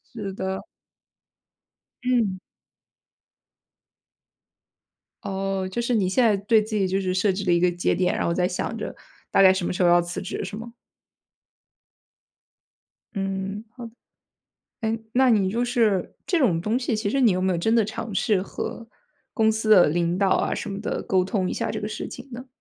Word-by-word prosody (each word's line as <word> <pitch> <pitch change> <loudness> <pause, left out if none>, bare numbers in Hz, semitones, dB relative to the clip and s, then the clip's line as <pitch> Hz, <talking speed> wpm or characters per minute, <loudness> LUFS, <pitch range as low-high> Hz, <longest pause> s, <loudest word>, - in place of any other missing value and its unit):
是 205 -4 -4
的。 190 0 -3 1.4
嗯。 230 -7 +1 2.8
哦， 195 -1 -2
就 235 - -2
是 240 +1 -1
你 195 -5 +2
现 245 +7 +2
在 215 -3 +4
对 210 +3 +3
自 215 +1 -5
己 195 -3 +2
就 190 +1 0
是 185 -1 -1
设 190 +2 +2
置 195 +1 -4
了 175 - +3
一 170 - +3
个 180 0 +3
节 175 0 0
点， 180 -1 +1
然 - - -1
后 170 - +1
在 180 +1 +1
想 180 - -3
着 - - -5 0.3
大 - - +4
概 190 -1 +8
什 190 -2 -2
么 - - -1
时 180 - 0
候 175 - +5
要 175 0 +5
辞 175 0 -5
职 190 - -4
是 200 +2 -6
吗？ 230 +2 -8 2.4
嗯， 195 +1 -3
好， 235 0 -9 0.9
哎， 225 0 -1 0.2
那 260 0 +4
你 200 -4 +3
就 235 +4 0
是 225 -7 +1
这 350 - +1
种 180 - +2
东 220 +6 0
西， 245 -2 -1
其 215 -1 -1
实 275 - 0
你 235 -6 +5
有 185 0 0
没 190 - +1
有 175 - 0
真 220 +7 +1
的 230 - +4
尝 220 0 -5
试 195 -1 +2
和 230 +3 -6 0.5
公 220 -2 +3
司 220 0 -2
的 195 -7 +7
领 170 +2 0
导 195 -1 +2
啊 - - +1
什 - - -5
么 195 - -5
的， - - -3
沟 185 -1 +1
通 190 -1 -1
一 - - -2
下 - - -2
这 - - -3
个 210 - -3
事 215 - -5
情 250 +2 -10
呢？ 250 +2 -8
200 Hz, 205 characters per minute, -24 LUFS, 185-225 Hz, 2.8 s, 概